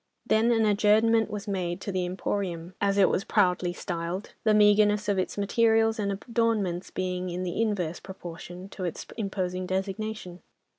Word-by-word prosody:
Then 225 Hz, +2 st, +3 dB
an 225 Hz, -2 st, +3 dB
adjournment 215 Hz, +2 st, +4 dB
was 210 Hz, 0 st, -6 dB
made 180 Hz, -3 st, -2 dB
to 200 Hz, -, -4 dB
the 185 Hz, -1 st, -1 dB
"Emporium," 180 Hz, -2 st, -3 dB
as 200 Hz, 0 st, +2 dB
it 195 Hz, -, +6 dB
was 190 Hz, -, 0 dB
proudly 180 Hz, -1 st, +2 dB
styled, 175 Hz, +2 st, -4 dB
the 215 Hz, -1 st, +4 dB
meagreness 210 Hz, 0 st, +4 dB
of 200 Hz, -2 st, +1 dB
its 185 Hz, -, -2 dB
materials 225 Hz, +2 st, +2 dB
and 200 Hz, -1 st, 0 dB
adornments 210 Hz, -4 st, -1 dB
being 185 Hz, 0 st, -3 dB
in 180 Hz, +1 st, -3 dB
the 180 Hz, +4 st, -2 dB
inverse 185 Hz, -7 st, -1 dB
proportion 180 Hz, 0 st, -9 dB
to 195 Hz, -, -7 dB
its 175 Hz, -3 st, -4 dB
imposing 185 Hz, -4 st, -3 dB
designation. 190 Hz, -1 st, -4 dB
195 Hz, 160 wpm, -27 LUFS, 180-215 Hz, -, it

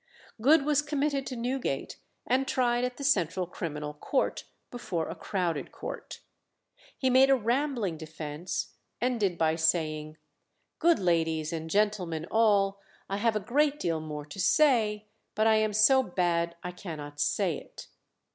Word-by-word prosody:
Good 285 Hz, +4 st, +5 dB
was 295 Hz, -1 st, +3 dB
committed 290 Hz, -2 st, -1 dB
to 255 Hz, -, -4 dB
Newgate, 245 Hz, -, -3 dB, 0.3 s
and 265 Hz, +2 st, +1 dB
tried 245 Hz, -1 st, +1 dB
at 250 Hz, 0 st, -2 dB
the 280 Hz, -, -6 dB
Central 185 Hz, -, +1 dB
Criminal 150 Hz, -4 st, -5 dB
Court 260 Hz, -, -1 dB, 0.3 s
before 185 Hz, -10 st, -3 dB
a -, -, -4 dB
crowded 175 Hz, -6 st, -2 dB
court. -, -, -7 dB, 0.8 s
He 260 Hz, -1 st, +1 dB
made 260 Hz, +2 st, +6 dB
a 270 Hz, -, +6 dB
rambling 240 Hz, -, -1 dB
defence, 155 Hz, +1 st, -5 dB, 0.3 s
ending 215 Hz, -7 st, 0 dB
by 160 Hz, 0 st, +2 dB
saying, 155 Hz, -2 st, 0 dB, 0.6 s
"Good 340 Hz, 0 st, +4 dB
ladies 165 Hz, -3 st, 0 dB
and 160 Hz, 0 st, -4 dB
gentlemen 185 Hz, -5 st, 0 dB
all, 200 Hz, -3 st, +3 dB, 0.3 s
I 195 Hz, -, 0 dB
have 225 Hz, +1 st, +1 dB
a -, -, +1 dB
great 285 Hz, +8 st, +1 dB
deal 165 Hz, -, -1 dB
more 150 Hz, -1 st, -6 dB
to 150 Hz, +6 st, -10 dB
say, 215 Hz, -1 st, +3 dB, 0.3 s
but 215 Hz, -, +2 dB
I 220 Hz, -1 st, +5 dB
am 215 Hz, 0 st, +1 dB
so 220 Hz, +6 st, +5 dB
bad 170 Hz, -5 st, 0 dB
I 180 Hz, -, -4 dB
cannot 150 Hz, -5 st, -8 dB
say -, -, +1 dB
it." -, -, -12 dB
200 Hz, 150 wpm, -29 LUFS, 165-250 Hz, 0.8 s, made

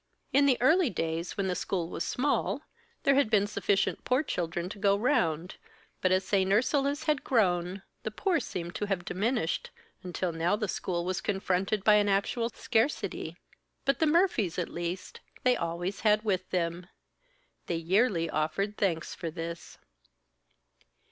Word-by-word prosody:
In 280 Hz, +1 st, +5 dB
the 260 Hz, -3 st, +4 dB
early 320 Hz, +4 st, +4 dB
days, 165 Hz, -1 st, -3 dB
when 200 Hz, -, 0 dB
the 185 Hz, -, 0 dB
school 180 Hz, -1 st, -2 dB
was -, -, -3 dB
small, 285 Hz, +3 st, 0 dB, 0.4 s
there 275 Hz, -, +5 dB
had 275 Hz, -4 st, +3 dB
been 210 Hz, -3 st, +4 dB
sufficient 205 Hz, -1 st, 0 dB
poor 255 Hz, +4 st, +2 dB
children 175 Hz, -, -2 dB
to 205 Hz, -, -8 dB
go 200 Hz, 0 st, +3 dB
round; 180 Hz, -, 0 dB, 0.4 s
but 185 Hz, -, +2 dB
as 185 Hz, 0 st, +2 dB
St. 195 Hz, -1 st, +2 dB
Ursula's 275 Hz, +6 st, +2 dB
had 300 Hz, -2 st, +1 dB
grown, 185 Hz, -5 st, +1 dB, 0.2 s
the -, -, -3 dB
poor 340 Hz, -, 0 dB
seemed 175 Hz, -8 st, -5 dB
to 205 Hz, -, -1 dB
have 190 Hz, -3 st, -2 dB
diminished, 205 Hz, -2 st, -1 dB, 0.3 s
until 180 Hz, -1 st, -2 dB
now 165 Hz, +4 st, +1 dB
the 210 Hz, 0 st, -2 dB
school 175 Hz, -2 st, -2 dB
was 185 Hz, +1 st, -1 dB
confronted 195 Hz, 0 st, 0 dB
by 210 Hz, 0 st, +6 dB
an 205 Hz, -1 st, +3 dB
actual 205 Hz, +4 st, +1 dB
scarcity. 240 Hz, +4 st, -1 dB, 0.5 s
But 275 Hz, -, +2 dB
the 320 Hz, -, +3 dB
Murphys, 300 Hz, -, +2 dB
at 180 Hz, -, -1 dB
least, 175 Hz, +2 st, -5 dB, 0.2 s
they 255 Hz, -, +5 dB
had -, -, -3 dB
always 170 Hz, +3 st, -3 dB, 0.2 s
with 185 Hz, -4 st, -1 dB
them. 175 Hz, 0 st, -2 dB, 0.8 s
They 170 Hz, -, -1 dB
yearly 175 Hz, +1 st, +2 dB
offered 160 Hz, +7 st, -1 dB
thanks 165 Hz, -5 st, 0 dB
for 170 Hz, -, -4 dB
this. 165 Hz, +1 st, -7 dB
195 Hz, 160 wpm, -29 LUFS, 175-230 Hz, 0.8 s, by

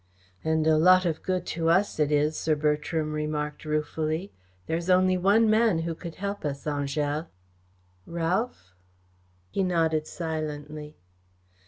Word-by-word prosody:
"And 160 Hz, 0 st, +1 dB
a 155 Hz, -1 st, +4 dB
lot 185 Hz, +2 st, +6 dB
of 165 Hz, -3 st, -1 dB
good 185 Hz, -1 st, -1 dB
to 165 Hz, 0 st, 0 dB
us 190 Hz, +1 st, +2 dB
it 150 Hz, -1 st, +2 dB
is," 150 Hz, +1 st, +2 dB
Sir 155 Hz, 0 st, +1 dB
Bertram 150 Hz, +1 st, 0 dB
remarked 150 Hz, -1 st, -3 dB
ruefully. 155 Hz, +3 st, -2 dB, 0.3 s
"There 160 Hz, -, -1 dB
is 170 Hz, +2 st, -3 dB
only 185 Hz, 0 st, +4 dB
one 200 Hz, +5 st, +4 dB
man 215 Hz, -6 st, +3 dB
who 170 Hz, -, -2 dB
could 165 Hz, 0 st, -8 dB
help 200 Hz, +1 st, -4 dB
us, 140 Hz, -2 st, -3 dB
Angèle." 145 Hz, +1 st, -1 dB, 0.8 s
"Ralph?" 170 Hz, -, -2 dB, 0.8 s
He 195 Hz, -, 0 dB
nodded 165 Hz, -4 st, +1 dB
silently. 150 Hz, -2 st, -5 dB
160 Hz, 140 wpm, -27 LUFS, 150-180 Hz, 0.8 s, lot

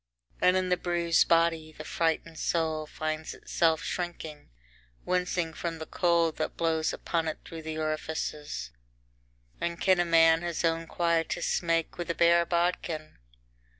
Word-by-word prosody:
And 180 Hz, +1 st, +5 dB
in 185 Hz, -1 st, 0 dB
the 180 Hz, -, +3 dB
bruised 170 Hz, -1 st, +2 dB
body, 165 Hz, -2 st, +2 dB
the 155 Hz, -, -9 dB
frightened 165 Hz, 0 st, -1 dB
soul 160 Hz, -2 st, 0 dB
finds 155 Hz, 0 st, -4 dB
itself 160 Hz, -2 st, +1 dB
shrinking, 165 Hz, -4 st, -5 dB, 0.6 s
wincing 180 Hz, -2 st, 0 dB
from 165 Hz, 0 st, -4 dB
the 160 Hz, -, -6 dB
cold 170 Hz, -2 st, +1 dB
that 155 Hz, -, -3 dB
blows 160 Hz, -1 st, +1 dB
upon 165 Hz, -1 st, -2 dB
it 155 Hz, -, -2 dB
through 165 Hz, -1 st, -8 dB
the 155 Hz, 0 st, -5 dB
orifices. 155 Hz, -, -3 dB, 0.9 s
III -, -, +2 dB
And 170 Hz, -, -9 dB
can 185 Hz, -2 st, +4 dB
a 175 Hz, -, +3 dB
man 165 Hz, -1 st, +5 dB
his 170 Hz, -1 st, -2 dB
own 165 Hz, 0 st, 0 dB
quietus 170 Hz, -3 st, 0 dB
make 165 Hz, 0 st, 0 dB
with 175 Hz, -, -4 dB
a 170 Hz, -, 0 dB
bare 170 Hz, 0 st, +4 dB
bodkin? 170 Hz, -, -1 dB
165 Hz, 150 wpm, -29 LUFS, 160-170 Hz, 0.9 s, And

